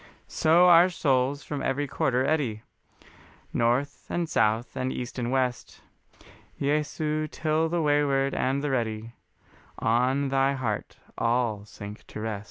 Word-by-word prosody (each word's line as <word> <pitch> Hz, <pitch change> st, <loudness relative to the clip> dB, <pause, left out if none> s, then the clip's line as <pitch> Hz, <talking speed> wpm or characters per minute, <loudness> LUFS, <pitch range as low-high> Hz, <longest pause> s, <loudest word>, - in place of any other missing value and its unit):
So 170 Hz, +3 st, +4 dB
our 175 Hz, +1 st, +7 dB
souls 135 Hz, -4 st, 0 dB
from 145 Hz, 0 st, -4 dB
every 140 Hz, +2 st, -1 dB
quarter 130 Hz, -1 st, 0 dB
eddy, 135 Hz, -9 st, -1 dB, 0.9 s
North 120 Hz, +5 st, 0 dB
and 175 Hz, -1 st, -1 dB
South 110 Hz, -2 st, +1 dB
and 130 Hz, 0 st, -2 dB
East 125 Hz, +1 st, -5 dB
and 120 Hz, 0 st, -2 dB
West, 130 Hz, -2 st, -2 dB, 0.8 s
Jesu, 150 Hz, +1 st, -1 dB
till 155 Hz, +1 st, 0 dB
the 170 Hz, 0 st, 0 dB
wayward 140 Hz, -2 st, +2 dB
and 135 Hz, +2 st, 0 dB
the 145 Hz, -, -1 dB
ready 115 Hz, -2 st, -2 dB, 0.6 s
On 130 Hz, +4 st, +1 dB
thy 135 Hz, 0 st, +2 dB
heart 120 Hz, -6 st, -3 dB, 0.2 s
all 115 Hz, -3 st, 0 dB
sink 105 Hz, 0 st, -10 dB
to -, -, -8 dB
rest. 110 Hz, -2 st, -3 dB
135 Hz, 135 wpm, -27 LUFS, 120-145 Hz, 0.9 s, our